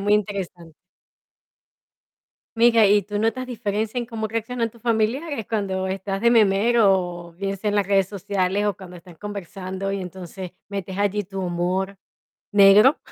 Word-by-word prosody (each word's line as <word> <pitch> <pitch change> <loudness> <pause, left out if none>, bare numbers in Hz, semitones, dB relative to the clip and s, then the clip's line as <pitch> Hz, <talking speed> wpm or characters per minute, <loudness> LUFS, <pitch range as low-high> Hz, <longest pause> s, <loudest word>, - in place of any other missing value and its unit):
muy 205 +1 +3
interesante. 185 -5 -3 1.8
Mira, 230 -1 +5
¿y 205 0 +4
tú 205 +1 -4
notas 250 +4 0
diferencia 220 -1 -3
en 240 -1 -1
cómo 225 -2 -4
reaccionan 230 +1 -2
tus 230 0 -20
familiares 235 +4 -1
cuando 195 -4 -1
estás 195 +1 -3
de 235 +2 +4
memero, 195 -5 +3
o - - -17
bien 195 +3 -3
sea 210 +3 -3
en 205 - 0
las 200 - +2
redes 195 -1 +2
sociales 200 0 -1
o 205 - 0
cuando 180 -2 -11
están 175 0 -14
conversando, 195 0 -5
y 200 - -2
entonces 180 0 -8 0.2
metes 195 -2 -5
allí 205 0 +1
tu 195 0 -6
humor 185 +2 -1 0.6
negro? 205 +7 +7
200 Hz, 155 wpm, -23 LUFS, 190-220 Hz, 1.8 s, negro